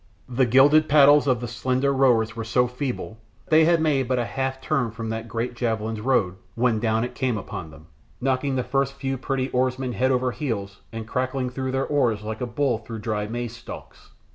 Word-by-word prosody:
The 125 0 +1
gilded 145 +6 +5
paddles 145 0 +6
of 125 -3 +2
the 120 - -3
slender 130 +4 0
rowers 120 -5 +3
were 115 - -4
so 120 +3 +2
feeble 125 -3 -5 0.3
they 160 0 +6
had 170 +1 +5
but - - -3
made 135 -5 +1
a 125 -2 +1
half 130 +1 -3
turn 135 -6 0
from 115 0 -6
that 110 +1 -4
great 115 +2 -3
javelin's 110 -2 -2
road 105 -7 +1 0.2
when 120 -2 +2
down 110 0 +1
it 125 - -4
came 130 -4 -1
upon 90 -4 -6
them, 75 0 -15 0.3
knocking 135 +1 0
the 130 - 0
first 135 +2 0
few 135 -1 -3
pretty 135 0 -2
oarsmen 130 0 0
head 130 +2 +1
over 130 -1 +1
heels 110 -9 -4
and 115 -1 -6
crackling 130 +1 -2
through 130 0 -3
their 135 0 0
oars 120 -8 +1
like 110 +2 -5
a 125 - -1
bull 120 -1 0
through 115 0 -8
dry 105 -1 -2
maize 120 +1 -4
stalks. - - -11
125 Hz, 205 wpm, -24 LUFS, 115-135 Hz, 0.3 s, paddles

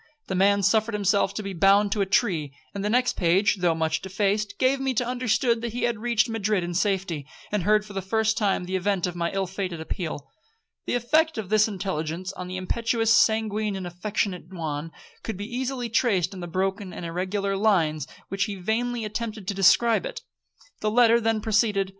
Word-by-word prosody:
The - - -1
man 200 +2 +3
suffered 220 +2 +2
himself 200 -1 +2
to 215 - -3
be 195 -1 -5
bound 195 +3 +4
to 205 - 0
a 195 - +1
tree; 165 - 0 0.2
and 200 - -4
the 210 - 0
next 250 +2 +2
page, 190 +4 +2
though 175 -3 +2
much 160 0 0
defaced, 205 +2 -1
gave 265 +1 +2
me 265 -1 -1
to 245 - +1
understand 235 -1 0
he 235 +1 -3
had 235 -3 0
reached 235 0 +2
Madrid 215 -4 0
in 175 0 -4
safety, 185 -6 -1 0.2
and 210 -2 0
heard 210 +3 +3
for 205 - -11
the 195 - -2
first 220 +3 +1
time 200 -4 +1
the 185 +1 -3
event 190 -1 0
of 180 -1 -4
my 170 -1 -1
ill 195 0 -1
fated 185 -2 -4
appeal. 160 -3 -5 0.6
The - - 0
effect 310 +7 +2
of 210 -4 -4
this 215 0 +4
intelligence 185 -3 -4
on 180 - -7
the 185 0 -5
impetuous, 225 +4 +1
sanguine, 215 -2 +2
and 190 -1 -5
affectionate 180 0 -3
Juan, 160 -3 -4 0.3
could 220 - -5
be 205 - -5
easily 250 +1 -3
traced 225 -7 +1
in 190 - -8
the 175 - -5
broken 190 +2 -2
and 175 - -6
irregular 190 +4 -2
lines 170 -8 +2
in - - -17 0.2
which 195 0 0
he 205 -2 -5
vainly 225 +5 -1
attempted 215 -2 -5
to - - 0
describe 200 +2 +4
it. - - -6 0.6
The 215 - 0
letter 235 +1 +5
then 225 -1 +1
proceeded. 210 -3 +1
200 Hz, 200 wpm, -25 LUFS, 185-220 Hz, 0.6 s, letter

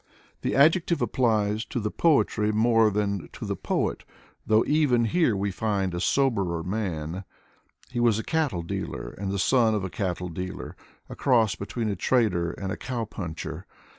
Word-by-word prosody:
The - - -1
adjective 165 +4 +4
applies 110 -4 +1
to - - -3
the 105 -1 -2
poetry 115 -9 +2
more 115 0 +4
than 100 -2 -2
to - - -7
the - - -2
poet, - - -2 0.4
though 110 +1 +4
even 145 -6 +3
here 160 - +2
we 100 +1 -1
find 95 -2 -1
a 85 - -2
soberer 100 -9 +1
man. 90 -3 -3 0.7
He 120 - -2
was 120 -3 +3
a 110 - -3
cattle 145 - 0
dealer - - -5
and 100 -1 -3
the 100 - -1
son 115 +1 +3
of 105 - -1
a 95 - -4
cattle 90 -4 -3
dealer: 90 +2 -6 0.3
a - - -8
cross 115 -6 +3
between 110 +3 -4
a 105 - -1
trader 95 -6 +1
and 95 -1 -5
a 105 - -3
cow 120 -3 -3
puncher. 85 -6 -6
105 Hz, 170 wpm, -26 LUFS, 95-120 Hz, 0.7 s, adjective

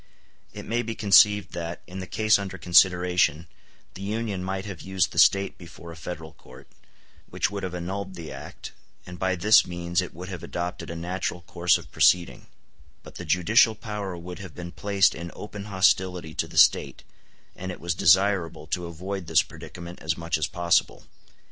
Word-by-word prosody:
] - - -38
It - - -8
may 120 +1 0
be 115 -1 -5
conceived 105 -2 +5
that, 85 0 -5
in 90 +1 -8
the 95 - -6
case 110 +3 +3
under 95 -1 -6
consideration, 90 -2 +3 0.5
the 95 - -10
Union 105 -2 -3
might 95 +1 -3
have 95 -6 -7
used 95 -1 0
the - - -1
State 100 0 +4
before 85 -1 -11
a - - -10
Federal 80 -1 -8
court, 65 -3 -16 0.6
which - - -1
would 100 -1 -4
have 90 -1 -4
annulled 95 +2 -5
the 85 -3 -8
act, - - -9 0.3
and 90 0 -10
by 95 0 0
this 105 +5 +5
means 85 +1 -1
it 90 - -6
would 90 +2 -8
have 90 -2 -7
adopted 90 0 -5
a 85 - -5
natural 90 +1 -3
course 85 0 +2
of - - -13
proceeding; 90 -2 +2 0.6
but - - -12
the - - -7
judicial 110 +5 +4
power 100 -4 -5
would 90 +1 -8
have 95 -6 -10
been 85 -1 -7
placed 100 0 +2
in 85 +1 -7
open 105 -1 -8
hostility 95 -4 +1
to - - -2
the - - -10
State, - - +4 0.5
and 95 0 -6
it - - -9
was 85 +1 -2
desirable 90 -2 +2
to 85 +2 -3
avoid 90 +2 -6
this 80 -1 +4
predicament 85 +2 -10
as 80 0 -1
much 85 0 -2
as 80 0 0
possible. 85 -1 +1
90 Hz, 185 wpm, -25 LUFS, 85-100 Hz, 0.6 s, conceived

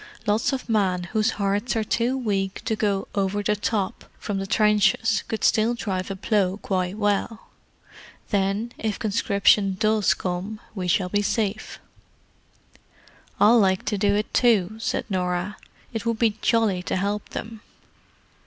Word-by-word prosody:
Lots 210 +4 +1
of 265 -2 -4
men 195 -6 +1
whose 215 -1 +2
hearts 205 +4 0
are 220 - +1
too 240 +4 0
weak 195 -6 -2
to 220 - 0
go 200 -2 -1
'over 200 +1 -1
the 210 +1 +1
top' 205 0 -2
from 200 -2 -3
the 195 - -4
trenches 210 0 +2
could 220 - -3 0.4
drive 185 -4 -3
a 195 - -3
plough 195 -1 0
quite 185 -1 -2
well. 205 0 -1 0.8
Then, 200 +3 0
if 215 -2 -2
conscription 200 -2 +2
does 215 -1 +3
come, 185 +4 -4
we 185 -4 -4
shall 180 +1 +1
be 205 +2 +1
safe." 215 0 -2 1.6
"I'll 230 +3 +6
like 190 -2 +2
to 210 -1 -1
do 205 0 +2
it, 210 +1 -2
too," 215 -4 +3
said - - -2
Norah. 180 0 -2 0.4
"It 225 - -3
would 230 -1 0
be 220 -2 +2
jolly 220 -6 +2
to - - -3
help 200 +2 -2
them." 225 -1 -7
205 Hz, 150 wpm, -24 LUFS, 195-220 Hz, 1.6 s, I'll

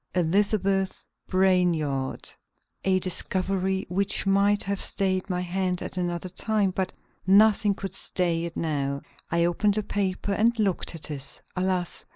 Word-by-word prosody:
"Elizabeth 195 +2 +1 0.2
Brainard" 175 -8 +1 0.6
a 190 -1 +3
discovery 190 +1 0
which 195 +3 0
might 200 +1 +3
have 200 0 -2
stayed 190 -1 0
my 180 -1 -1
hand 180 0 -1
at - - -4
another 175 0 -2
time, 205 +1 0
but 185 0 -2 0.4
nothing 205 +1 +5
could 195 -1 -6
stay 170 -3 -1
it 170 - -6
now. 140 -3 -1 0.3
I 170 0 +2
opened 200 +4 +2
the 215 - 0
paper 200 -1 -1
and 230 +3 +2
looked 195 -5 0
at 155 -1 -5
it. 140 -1 -4
Alas! 185 -1 -1
185 Hz, 140 wpm, -26 LUFS, 175-195 Hz, 0.6 s, nothing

